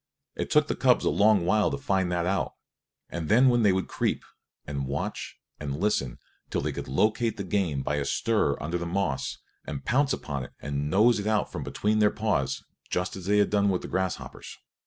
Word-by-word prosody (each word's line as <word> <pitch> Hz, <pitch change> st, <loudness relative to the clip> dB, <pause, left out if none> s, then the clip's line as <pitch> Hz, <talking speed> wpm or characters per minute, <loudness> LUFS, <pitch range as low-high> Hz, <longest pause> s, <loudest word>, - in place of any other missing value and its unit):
It -, -, -3 dB
took -, -, +4 dB
the -, -, -1 dB
cubs -, -, +3 dB
a -, -, +3 dB
long 105 Hz, -3 st, +4 dB
while 105 Hz, +3 st, +3 dB
to -, -, -2 dB
find 95 Hz, -9 st, 0 dB
that 85 Hz, -1 st, 0 dB
out; 95 Hz, +2 st, 0 dB, 0.6 s
and 80 Hz, -2 st, -4 dB
then 125 Hz, +5 st, +6 dB
they 105 Hz, -3 st, +5 dB
would 95 Hz, 0 st, 0 dB
creep -, -, -1 dB, 0.4 s
and 70 Hz, -2 st, -3 dB
watch 70 Hz, +1 st, -4 dB, 0.2 s
and 70 Hz, -1 st, -4 dB
listen 70 Hz, -12 st, 0 dB, 0.3 s
till -, -, -1 dB
they -, -, -1 dB
could -, -, -6 dB
locate 110 Hz, -, +1 dB
the 100 Hz, -, -3 dB
game 90 Hz, -8 st, 0 dB
by 75 Hz, -, -1 dB
a 70 Hz, -, -1 dB
stir 105 Hz, -10 st, +1 dB
under 85 Hz, +4 st, -2 dB
the 85 Hz, -, -3 dB
moss, 85 Hz, -6 st, -1 dB, 0.3 s
and 70 Hz, -, -6 dB
pounce 135 Hz, +3 st, +2 dB
upon 70 Hz, -3 st, -3 dB
it -, -, -14 dB
and 70 Hz, +1 st, -3 dB
nose 105 Hz, +6 st, +4 dB
it 100 Hz, -, -3 dB
out 110 Hz, -1 st, +1 dB
from -, -, -5 dB
between 105 Hz, +1 st, 0 dB
their 105 Hz, -1 st, +5 dB
paws, 80 Hz, -12 st, -1 dB, 0.3 s
just 90 Hz, 0 st, -1 dB
as 95 Hz, -2 st, -8 dB
they 105 Hz, +1 st, +3 dB
had 105 Hz, -, +3 dB
done 100 Hz, -1 st, +3 dB
with 90 Hz, -2 st, 0 dB
the -, -, -5 dB
grasshoppers. 95 Hz, -1 st, -4 dB
95 Hz, 210 wpm, -27 LUFS, 75-105 Hz, 0.6 s, then